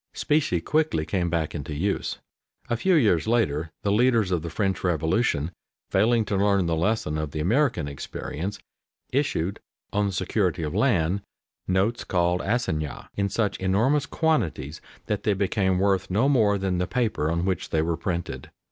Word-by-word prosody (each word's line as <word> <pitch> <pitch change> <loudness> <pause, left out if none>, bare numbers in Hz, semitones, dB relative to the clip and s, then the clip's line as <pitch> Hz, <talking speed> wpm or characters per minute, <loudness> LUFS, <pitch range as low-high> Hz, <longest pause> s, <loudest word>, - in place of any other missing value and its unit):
Specie 145 - +1
quickly 150 - +1
came 90 -1 -1
back 80 -2 -1
into 75 +1 -5
use. 95 +7 -1 0.5
A - - +3
few 185 +10 +2
years 105 - +3
later 85 -10 +1
the 100 - +1
leaders 115 -3 +3
of 90 -3 +1
the 85 - -5
French 95 +3 -1
Revolution, 80 -1 +1 0.4
failing 115 0 +3
to 105 - -1
learn 100 -1 +3
the 85 -1 +1
lesson 80 -3 0
of 75 -1 -2
the 75 - -5
American 105 - +1
experience, 75 +6 -5 0.5
issued, 125 - 0 0.3
on 105 0 +2
the - - -1
security 90 -2 0
of 75 - -3
land, 85 +5 +2 0.5
notes 95 +6 +1
called 90 0 +1
assignats 80 - -2
in 100 0 -1
such 105 0 -1
enormous 115 +10 +2
quantities 95 - -1 0.2
that 105 - -1
they 105 - +2
became 95 -1 +1
worth 95 -1 +1
no 105 +8 +2
more 110 -8 +3
than 95 -2 -1
the 90 - 0
paper 115 - 0
on 85 +2 0
which 95 -3 -1
they 80 -1 +1
were 85 +1 0
printed. 85 0 -4
95 Hz, 165 wpm, -25 LUFS, 85-110 Hz, 0.5 s, A